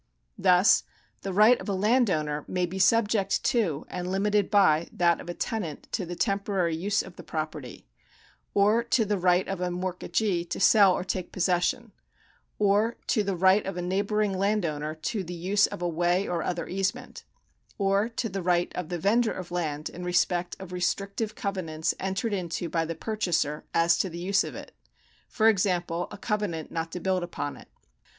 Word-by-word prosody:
Thus 180 Hz, +2 st, +5 dB, 0.4 s
the 195 Hz, -, -4 dB
right 215 Hz, +6 st, +5 dB
of -, -, -6 dB
a 195 Hz, -, 0 dB
landowner 185 Hz, -, +1 dB
may 180 Hz, -1 st, 0 dB
be 185 Hz, +2 st, -6 dB
subject 205 Hz, 0 st, +2 dB
to 200 Hz, -, 0 dB
and 180 Hz, 0 st, -5 dB
limited 200 Hz, +1 st, +1 dB
by 170 Hz, -6 st, +4 dB
that 170 Hz, -1 st, +2 dB
of -, -, -10 dB
a 175 Hz, -, -4 dB
tenant 180 Hz, -10 st, -4 dB
to 190 Hz, -7 st, -2 dB
the 175 Hz, -, -5 dB
temporary 195 Hz, -3 st, 0 dB
use 195 Hz, +5 st, 0 dB
of 190 Hz, -, -13 dB
the -, -, -9 dB
property; 155 Hz, -5 st, -6 dB, 0.7 s
or 210 Hz, +4 st, +4 dB
to 235 Hz, -1 st, +2 dB
the 205 Hz, -1 st, -1 dB
right 180 Hz, 0 st, +3 dB
of 195 Hz, -2 st, -4 dB
a 180 Hz, -, 0 dB
mortgagee 180 Hz, +1 st, -1 dB
to -, -, -5 dB
sell 200 Hz, -4 st, +6 dB
or -, -, -3 dB
take 185 Hz, -1 st, -4 dB
possession; 185 Hz, +6 st, 0 dB, 0.7 s
or 210 Hz, +3 st, +2 dB
to 215 Hz, -, +2 dB
the 200 Hz, -2 st, -1 dB
right 190 Hz, +3 st, +4 dB
of 195 Hz, -, -4 dB
a -, -, -2 dB
neighbouring 200 Hz, +2 st, 0 dB
landowner 170 Hz, -7 st, -1 dB
to 195 Hz, +6 st, -3 dB
the 175 Hz, 0 st, -7 dB
use 195 Hz, +4 st, +2 dB
of 175 Hz, -, -7 dB
a -, -, +1 dB
way 175 Hz, +3 st, +1 dB
or 175 Hz, -2 st, -1 dB
other 170 Hz, -1 st, -3 dB
easement; 195 Hz, +1 st, -3 dB, 0.5 s
or 200 Hz, +2 st, +1 dB
to 230 Hz, 0 st, -3 dB
the 195 Hz, -2 st, -4 dB
right 175 Hz, 0 st, +1 dB
of 180 Hz, -3 st, -4 dB
the 175 Hz, -, -2 dB
vendor 220 Hz, +6 st, +2 dB
of 180 Hz, -1 st, -8 dB
land 155 Hz, -4 st, -2 dB
in 180 Hz, -, -8 dB
respect 180 Hz, 0 st, 0 dB
of 190 Hz, -2 st, -9 dB
restrictive 200 Hz, +4 st, -2 dB
covenants 165 Hz, -5 st, -2 dB
entered 190 Hz, +3 st, -2 dB
into 175 Hz, -2 st, -3 dB
by 165 Hz, 0 st, 0 dB
the 165 Hz, +1 st, -4 dB
purchaser 175 Hz, -9 st, -1 dB
as 170 Hz, +1 st, +3 dB
to 190 Hz, -, 0 dB
the 170 Hz, -, -8 dB
use 195 Hz, +3 st, +1 dB
of -, -, -7 dB
it; -, -, -9 dB, 0.6 s
for 220 Hz, -1 st, +2 dB
example, 180 Hz, -4 st, +1 dB
a 210 Hz, -, -9 dB
covenant 200 Hz, -7 st, -3 dB
not 165 Hz, 0 st, -3 dB
to 180 Hz, -, -5 dB
build 185 Hz, +1 st, 0 dB
upon 170 Hz, -4 st, -4 dB
it. -, -, -14 dB
185 Hz, 185 wpm, -27 LUFS, 175-205 Hz, 0.7 s, sell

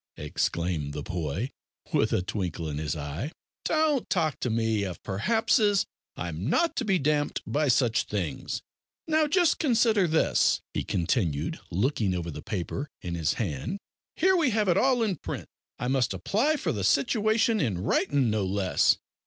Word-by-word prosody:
exclaimed 75 Hz, 0 st, -2 dB
the 75 Hz, -1 st, -4 dB
boy, 90 Hz, -, -3 dB, 0.4 s
with -, -, +2 dB
a -, -, +1 dB
twinkle 90 Hz, -4 st, -3 dB
in 75 Hz, -1 st, -3 dB
his 75 Hz, 0 st, -2 dB
eye; 75 Hz, -, -4 dB, 0.3 s
"don't 310 Hz, -5 st, +1 dB
talk 160 Hz, -6 st, 0 dB
to 125 Hz, -, -1 dB
me 110 Hz, -1 st, +1 dB
of 95 Hz, -3 st, -4 dB
perhapses, 205 Hz, -, +2 dB, 0.3 s
I'm 85 Hz, -, -4 dB
not 330 Hz, -, +2 dB
to 245 Hz, -, 0 dB
be 195 Hz, -3 st, +3 dB
damped 145 Hz, -1 st, 0 dB
by 150 Hz, +1 st, 0 dB
such 120 Hz, -2 st, +3 dB
things. 90 Hz, -9 st, -3 dB, 0.4 s
Now, 315 Hz, -1 st, +3 dB
just 340 Hz, 0 st, +3 dB
consider 225 Hz, -, +3 dB
this," 160 Hz, 0 st, +3 dB
he -, -, -1 dB
continued, 85 Hz, -, -1 dB
looking 105 Hz, -, 0 dB
over 85 Hz, -1 st, -3 dB
the -, -, -7 dB
paper 105 Hz, -, -4 dB
in 85 Hz, -, -4 dB
his 80 Hz, -3 st, 0 dB
hand, 105 Hz, -, -3 dB, 0.4 s
"here 380 Hz, 0 st, +4 dB
we 325 Hz, -7 st, +3 dB
have 215 Hz, -2 st, +1 dB
it 175 Hz, -, +4 dB
all 255 Hz, -3 st, +3 dB
in 200 Hz, -6 st, 0 dB
print. -, -, -5 dB, 0.3 s
I 125 Hz, -, -3 dB
must 130 Hz, -2 st, +1 dB
apply 285 Hz, +10 st, +1 dB
for 185 Hz, -, -1 dB
the 105 Hz, -7 st, -3 dB
situation 215 Hz, -, +2 dB
in 110 Hz, -, 0 dB
writin' 120 Hz, +6 st, +1 dB
no 105 Hz, -2 st, 0 dB
less. 95 Hz, 0 st, +2 dB
125 Hz, 165 wpm, -27 LUFS, -, 0.4 s, here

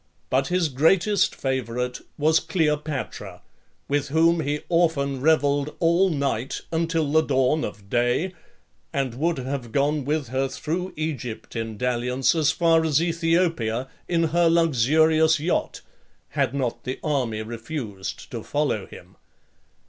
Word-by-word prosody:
But 135 Hz, +1 st, +2 dB
his 180 Hz, -2 st, +1 dB
greatest 170 Hz, +9 st, +2 dB
favourite 125 Hz, -2 st, -2 dB, 0.2 s
was 155 Hz, +2 st, +4 dB
Cleopatra, 150 Hz, -, -2 dB, 0.4 s
with 145 Hz, 0 st, 0 dB
whom 165 Hz, +3 st, +3 dB
he 150 Hz, -1 st, -1 dB
often 145 Hz, -6 st, +1 dB
revelled 145 Hz, -1 st, +2 dB
all 170 Hz, +3 st, +3 dB
night 140 Hz, -6 st, -2 dB
until 165 Hz, -2 st, 0 dB
the 160 Hz, +1 st, +5 dB
dawn 140 Hz, +1 st, +1 dB
of 100 Hz, -1 st, -6 dB
day, 120 Hz, -, +1 dB, 0.6 s
and 135 Hz, -5 st, -1 dB
would 160 Hz, +6 st, 0 dB
have 130 Hz, -2 st, -4 dB
gone 145 Hz, +3 st, +1 dB
with 145 Hz, -2 st, -1 dB
her 135 Hz, +2 st, 0 dB
through 175 Hz, +7 st, -4 dB
Egypt 145 Hz, -9 st, -5 dB
in 115 Hz, -2 st, -4 dB
dalliance, 125 Hz, +1 st, +1 dB
as 155 Hz, -3 st, +2 dB
far 165 Hz, 0 st, +3 dB
as 155 Hz, -3 st, +2 dB
Aethiopia, 165 Hz, -8 st, 0 dB, 0.2 s
in 170 Hz, -1 st, +1 dB
her 170 Hz, -1 st, +4 dB
luxurious 160 Hz, +1 st, +3 dB
yacht, 165 Hz, +4 st, -1 dB, 0.5 s
had -, -, 0 dB
not 130 Hz, -4 st, -2 dB
the 130 Hz, +2 st, -4 dB
army 125 Hz, -8 st, -1 dB
refused 115 Hz, -3 st, -6 dB
to -, -, -5 dB
follow -, -, -1 dB
him. -, -, -14 dB
145 Hz, 135 wpm, -24 LUFS, 125-165 Hz, 0.6 s, the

